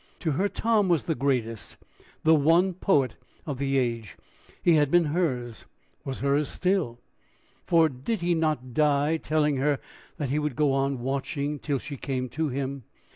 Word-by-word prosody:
To 160 Hz, -, 0 dB
her, 190 Hz, +8 st, +1 dB
Tom 220 Hz, -4 st, +1 dB
was 170 Hz, -3 st, +2 dB
the 165 Hz, -, -1 dB
greatest, 120 Hz, -5 st, -2 dB, 0.5 s
the 160 Hz, -, +5 dB
one 165 Hz, +5 st, +4 dB
poet 145 Hz, -, +1 dB, 0.3 s
of 140 Hz, -5 st, -4 dB
the 135 Hz, -1 st, 0 dB
age; 115 Hz, -5 st, -2 dB, 0.5 s
he 175 Hz, -, +5 dB
had 150 Hz, -3 st, +3 dB
been 175 Hz, +3 st, +5 dB
hers 130 Hz, -, -2 dB, 0.4 s
was 135 Hz, -1 st, -5 dB
hers 140 Hz, +1 st, +1 dB
still, 180 Hz, -11 st, 0 dB, 0.7 s
for 165 Hz, -2 st, +5 dB
did 155 Hz, -, -4 dB
he 175 Hz, 0 st, +2 dB
not 155 Hz, -7 st, -1 dB
die 150 Hz, +2 st, +2 dB
telling 150 Hz, -2 st, +1 dB
her 140 Hz, +1 st, +1 dB, 0.4 s
that 145 Hz, -4 st, -3 dB
he 145 Hz, +3 st, +1 dB
would 150 Hz, -4 st, -2 dB
go 145 Hz, -1 st, +2 dB
on 135 Hz, -2 st, 0 dB
watching 140 Hz, +3 st, -2 dB
till 145 Hz, 0 st, -1 dB
she 140 Hz, +2 st, -7 dB
came 130 Hz, -1 st, -3 dB
to 155 Hz, +5 st, -2 dB
him? 135 Hz, +1 st, -3 dB
145 Hz, 170 wpm, -26 LUFS, 135-160 Hz, 0.7 s, the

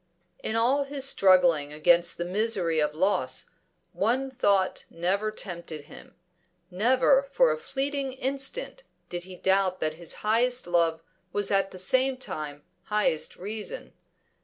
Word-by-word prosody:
In 220 Hz, -, -3 dB
all 260 Hz, +5 st, +2 dB
his 275 Hz, -1 st, -1 dB
struggling 180 Hz, -, +4 dB
against 170 Hz, +3 st, +3 dB
the 175 Hz, -, -3 dB
misery 185 Hz, -4 st, 0 dB
of 150 Hz, 0 st, 0 dB
loss, 190 Hz, +5 st, 0 dB, 0.4 s
one 265 Hz, +3 st, 0 dB
thought 200 Hz, -7 st, +1 dB
never 190 Hz, +5 st, -1 dB
tempted 170 Hz, -7 st, -6 dB
him. -, -, -14 dB, 0.6 s
Never 255 Hz, +7 st, +4 dB
for -, -, +4 dB
a -, -, -1 dB
fleeting 280 Hz, -, -2 dB
instant 275 Hz, -, -1 dB, 0.3 s
did 175 Hz, 0 st, -5 dB
he 185 Hz, -1 st, -10 dB
doubt 190 Hz, 0 st, +1 dB
that 155 Hz, 0 st, -1 dB
his 170 Hz, -, -5 dB
highest 245 Hz, +3 st, +2 dB
love 165 Hz, -2 st, +1 dB, 0.3 s
was 205 Hz, +1 st, -1 dB
at 195 Hz, -1 st, +2 dB
the 185 Hz, -, -11 dB
same 260 Hz, +8 st, +1 dB
time 155 Hz, -, -6 dB, 0.2 s
highest 210 Hz, -7 st, 0 dB
reason. 215 Hz, -, -6 dB
195 Hz, 135 wpm, -27 LUFS, 175-255 Hz, 0.6 s, struggling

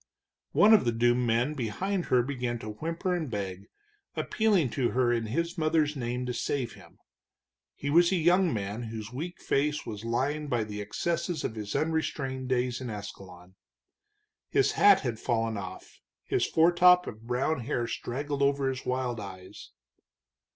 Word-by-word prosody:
One 215 Hz, +2 st, +6 dB
of 215 Hz, -, +6 dB
the 120 Hz, -, +1 dB
doomed 120 Hz, +1 st, +2 dB
men 120 Hz, +6 st, +1 dB
behind 175 Hz, -, -2 dB
her 125 Hz, -1 st, +3 dB
began 125 Hz, -3 st, -3 dB
to 110 Hz, -2 st, -7 dB
whimper 165 Hz, -, -3 dB
and 165 Hz, -5 st, -2 dB
beg, 100 Hz, -2 st, -5 dB, 0.5 s
appealing 200 Hz, -, +1 dB
to 125 Hz, -4 st, 0 dB
her 125 Hz, -1 st, +2 dB
in 115 Hz, -2 st, -1 dB
his 170 Hz, -, -2 dB
mother's 155 Hz, -1 st, +2 dB
name 125 Hz, -1 st, -3 dB
to 125 Hz, -, -2 dB
save 120 Hz, 0 st, -2 dB
him. -, -, -16 dB, 0.8 s
He 140 Hz, -, -3 dB
was 170 Hz, +3 st, +5 dB
a -, -, +3 dB
young 175 Hz, +1 st, +3 dB
man, 105 Hz, 0 st, -3 dB
whose 110 Hz, 0 st, -7 dB
weak 170 Hz, +7 st, -5 dB
face 150 Hz, +2 st, 0 dB
was 105 Hz, -1 st, -6 dB
lined 140 Hz, +6 st, -1 dB
by 120 Hz, -4 st, +1 dB
the 105 Hz, -1 st, -6 dB
excesses 165 Hz, -, -2 dB
of -, -, -2 dB
his 105 Hz, -2 st, -5 dB
unrestrained 135 Hz, -5 st, -1 dB
days 125 Hz, 0 st, 0 dB
in 125 Hz, -, -5 dB
Ascalon. 95 Hz, -4 st, -9 dB, 1.0 s
His 410 Hz, -, +3 dB
hat 200 Hz, -2 st, +6 dB
had 120 Hz, -4 st, -3 dB
fallen 115 Hz, -2 st, 0 dB
off, 95 Hz, -2 st, -8 dB, 0.2 s
his -, -, +1 dB
foretop 180 Hz, +2 st, +5 dB
of 110 Hz, +1 st, -9 dB
brown 130 Hz, +5 st, 0 dB
hair 120 Hz, -1 st, -2 dB
straggled 140 Hz, +5 st, -4 dB
over 140 Hz, -1 st, +2 dB
his 130 Hz, 0 st, -4 dB
wild 125 Hz, -2 st, -2 dB
eyes. 95 Hz, 0 st, -10 dB
125 Hz, 165 wpm, -28 LUFS, 115-155 Hz, 1.0 s, One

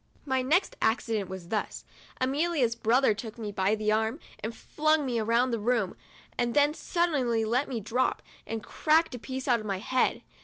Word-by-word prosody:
79 -, -, -32 dB
My 260 Hz, -1 st, +2 dB
next 360 Hz, +5 st, +2 dB
accident 220 Hz, -4 st, 0 dB
was 185 Hz, -2 st, -8 dB
thus: 215 Hz, -, -3 dB, 0.3 s
Amelia's 275 Hz, -1 st, +1 dB
brother 235 Hz, +1 st, +3 dB
took 220 Hz, +2 st, -8 dB
me 215 Hz, -3 st, -4 dB
by 195 Hz, +1 st, +1 dB
the 215 Hz, 0 st, 0 dB
arm 220 Hz, +6 st, 0 dB, 0.2 s
and 225 Hz, +1 st, -5 dB
flung 310 Hz, -1 st, +1 dB
me 240 Hz, -3 st, 0 dB
round 235 Hz, +3 st, +2 dB
the 230 Hz, -, 0 dB
room, 220 Hz, -3 st, 0 dB, 0.4 s
and 240 Hz, -1 st, 0 dB
then 290 Hz, +1 st, +4 dB
suddenly 275 Hz, -11 st, 0 dB
let 245 Hz, +6 st, 0 dB
me 245 Hz, -4 st, -2 dB
drop, 225 Hz, +5 st, 0 dB, 0.2 s
and 225 Hz, -1 st, -4 dB
cracked 315 Hz, +5 st, +2 dB
a 245 Hz, -, -5 dB
piece 260 Hz, +3 st, -5 dB
out 240 Hz, -3 st, +4 dB
of 215 Hz, -, -8 dB
my 195 Hz, -2 st, -1 dB
head. 255 Hz, +6 st, 0 dB
235 Hz, 190 wpm, -28 LUFS, 220-270 Hz, 0.4 s, then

